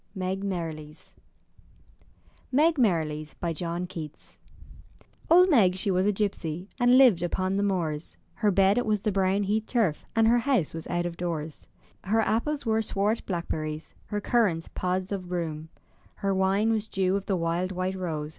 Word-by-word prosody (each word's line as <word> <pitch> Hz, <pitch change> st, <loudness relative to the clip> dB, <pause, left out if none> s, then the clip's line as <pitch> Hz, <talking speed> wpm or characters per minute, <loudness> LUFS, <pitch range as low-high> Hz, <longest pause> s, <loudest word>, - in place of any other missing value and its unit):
211 190 Hz, +1 st, -2 dB
MY 170 Hz, -4 st, -2 dB
BOOK 150 Hz, -1 st, -10 dB
HOUSE 155 Hz, +2 st, -18 dB, 1.4 s
MEG 310 Hz, +5 st, +3 dB
MERRILIES 155 Hz, -8 st, 0 dB, 0.2 s
John 170 Hz, +1 st, -3 dB
Keats 160 Hz, -4 st, -9 dB, 0.9 s
Old 360 Hz, +2 st, +7 dB
Meg 195 Hz, -10 st, +5 dB
she 195 Hz, +1 st, 0 dB
was 185 Hz, +2 st, +2 dB
a -, -, +4 dB
gipsy, 190 Hz, -4 st, -3 dB
And 245 Hz, 0 st, +4 dB
Uved 235 Hz, -11 st, +6 dB
upon 185 Hz, +2 st, -1 dB
the 200 Hz, -, +1 dB
moors; 170 Hz, -6 st, -2 dB, 0.2 s
Her 215 Hz, -, +1 dB
bed 195 Hz, +3 st, +4 dB
it 245 Hz, -, -1 dB
was 210 Hz, -2 st, 0 dB
the 215 Hz, -, +1 dB
brown 195 Hz, +1 st, +1 dB
heath 215 Hz, +2 st, -1 dB
turf, 215 Hz, -11 st, 0 dB
And 225 Hz, 0 st, +4 dB
her 240 Hz, +1 st, +4 dB
house 245 Hz, -, +1 dB
was 165 Hz, -1 st, -6 dB
out 175 Hz, 0 st, -1 dB
of 170 Hz, -1 st, -4 dB
doors. 160 Hz, -3 st, -5 dB, 0.4 s
Her 220 Hz, +4 st, +2 dB
apples 265 Hz, +7 st, -1 dB
were 220 Hz, 0 st, +2 dB
swart 210 Hz, +1 st, -1 dB
blackberries, 160 Hz, -4 st, -4 dB
Her 210 Hz, -, -2 dB
currants 200 Hz, -7 st, +1 dB
pods 185 Hz, +1 st, -2 dB
o' 200 Hz, -, -1 dB
broom; 165 Hz, -4 st, -4 dB, 0.5 s
Her 195 Hz, -1 st, -1 dB
wine 195 Hz, +3 st, +2 dB
was 220 Hz, -1 st, -1 dB
dew 190 Hz, -2 st, 0 dB
of 200 Hz, 0 st, -3 dB
the 195 Hz, -, +1 dB
wild 170 Hz, +2 st, -1 dB
white 185 Hz, 0 st, -2 dB
rose. 160 Hz, -5 st, -4 dB
190 Hz, 175 wpm, -27 LUFS, 170-210 Hz, 1.4 s, Old